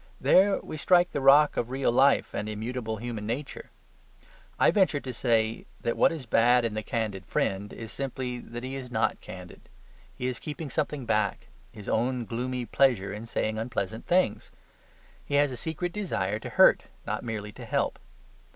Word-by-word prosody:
There 195 +1 +5
we 155 - -7
strike 175 +4 +4
the 145 - -2
rock 145 +2 +6
of 120 - -1
real 130 -1 +1
life 135 +3 +3
and 105 +1 -3
immutable 110 +1 -4
human 110 -2 -5
nature. 130 +6 -5 0.9
I - - +5
venture 190 -8 +3
to 130 -2 -6
say 115 -2 0
that 115 - -1
what - - +4
is 155 -6 -6
bad 120 +2 +4
in 115 - -1
the 110 - -2
candid 105 -3 -3
friend 95 +1 -1
is 115 -1 -8
simply 130 -2 -4
that 120 +1 -8
he 130 +1 -5
is 135 -2 -6
not - - 0
candid. - - -11 0.5
He 125 - -4
is 125 -2 -2
keeping 150 -2 -6
something 150 -4 -2
back 105 -3 0 0.2
his 105 -2 -11
own 120 +1 0
gloomy 125 +2 -3
pleasure 115 -8 +2
in 110 +2 -7
saying 110 -1 -1
unpleasant 110 -2 -4
things. 175 - +1 0.7
He 145 - -3
has 145 -1 +4
a - - -4
secret 160 +7 -3
desire 105 - -2
to - - -7
hurt, - - +5 0.2
not - - -3
merely 110 -3 -4
to - - -11
help. - - -1
120 Hz, 180 wpm, -28 LUFS, 110-140 Hz, 0.9 s, rock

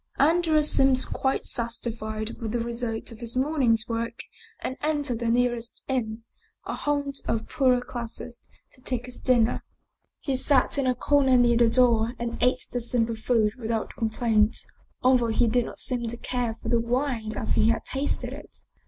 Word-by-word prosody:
Andrea 315 +1 +3
seemed 270 -3 +3
quite 265 0 -1
satisfied 225 -2 -3
with 220 -1 -3
the 240 - 0
result 235 -1 -3
of 225 - -11
his 235 +1 -3
morning's 255 -5 +2
work 230 +1 -3 0.4
and 260 - -4
entered 290 -6 -1
the 235 - -2
nearest 240 0 0
inn, 230 -4 -2 0.4
a - - -3
haunt 285 -1 -1
of 230 - +2
the 220 - -8
poorer 255 -4 +2
classes, 240 0 -7 0.3
to 255 - -21
take 250 -1 -3
his 250 -1 -8
dinner. 240 -3 +2 0.6
He 275 -3 -2
sat 265 +1 +3
in 270 - +1
a 255 - +2
corner 265 0 +3
near 240 -1 +4
the 235 -1 +5
door 235 -1 +3
and 235 -1 -3
ate 250 +1 +2
the 245 - -2
simple 230 -1 0
food 220 -1 +1
without 225 -1 -2
complaint, 220 -1 +1 0.5
al 255 0 +6
though 235 - 0
he 230 +2 +2
did 235 +1 +2
not - - -8
seem 245 -2 +1
to 235 +1 -3
care 240 -2 -2
for - - -7
the 235 - +3
wine 235 -2 -1
after - - 0
he 220 - +4
had 230 - 0
tasted 275 +2 -2
it. - - -12
240 Hz, 180 wpm, -26 LUFS, 230-260 Hz, 0.6 s, al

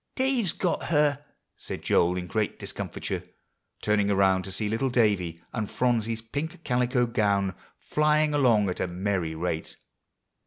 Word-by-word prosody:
"Dave's 260 -8 +2
got 180 0 -1
her," 145 -2 +2 0.3
said - - -7
Joel 90 +1 +3
in 90 - -3
great 105 +3 -1
discomfiture, - - -4 0.6
turning 105 -1 +2
around 95 -1 +3
to 95 - -6
see 105 +3 -1
little 115 +5 0
Davie 100 -9 +1
and 110 -3 -2
Phronsie's 115 -2 0
pink 150 +8 -5
calico 125 0 +2
gown 100 -5 +1 0.2
flying 150 0 +2
along 120 -8 +4
at - - -5
a - - 0
merry 90 -2 -2
rate. 80 -1 -3
110 Hz, 145 wpm, -27 LUFS, 95-140 Hz, 0.6 s, along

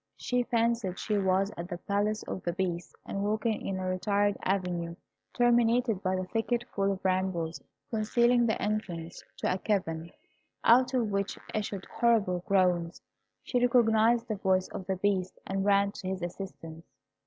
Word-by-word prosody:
She 250 0 0
fancied 230 -5 0
she 210 -2 0
was 190 +1 +2
at 170 0 -5
the 175 -2 -5
Palace 205 +3 -1
of 185 - -5
the 175 - -2
Beast, 175 -2 -3
and 195 - -3
walking 215 +2 0
in 195 - -2
a 185 - -3
retired 200 +2 +1
avenue, 180 -3 -1 0.4
terminated 240 -3 +3
by 185 -1 0
a 185 - -1
thicket 225 +5 -1
full 195 0 +1
of 190 - -9
brambles, 185 -3 0 0.3
concealing 235 +2 +3
the 220 - 0
entrance 180 -6 -3
to - - 0
a 185 - -3
cavern, 170 -6 -1 0.5
out 255 +2 +5
of 230 -4 +1
which 200 0 -1 0.2
issued 205 -2 -3
horrible 215 -7 +2
groans. 180 -3 +1 0.4
She 250 - 0
recognised 235 -1 +4
the 215 - -2
voice 190 -1 +1
of 185 - -7
the 190 - 0
Beast, 185 -1 0
and 195 0 -2
ran 200 0 +4
to 195 - -8
his 190 -1 -3
assistance. 170 -3 -7
200 Hz, 165 wpm, -29 LUFS, 185-225 Hz, 0.5 s, out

